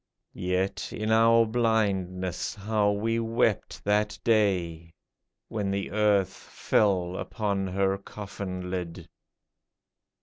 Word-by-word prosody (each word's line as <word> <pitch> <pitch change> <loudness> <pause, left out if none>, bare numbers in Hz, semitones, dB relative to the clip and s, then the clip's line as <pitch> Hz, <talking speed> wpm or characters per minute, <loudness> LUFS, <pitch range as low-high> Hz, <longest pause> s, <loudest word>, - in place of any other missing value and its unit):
Yet, 90 +1 -2
in 110 +1 -2
our 115 +1 +5
blindness, 100 -6 0
how 105 0 +1
we 110 +3 0
wept 115 0 0
that 105 +1 +1
day. 90 -7 +1 0.5
When 105 -3 -2
the 100 0 -2
earth 100 -3 +2
fell 95 -4 0
upon 100 -2 -2
her 95 +1 0
coffin 95 -3 -6
lid 90 -2 -5
100 Hz, 100 wpm, -27 LUFS, 95-110 Hz, 0.5 s, our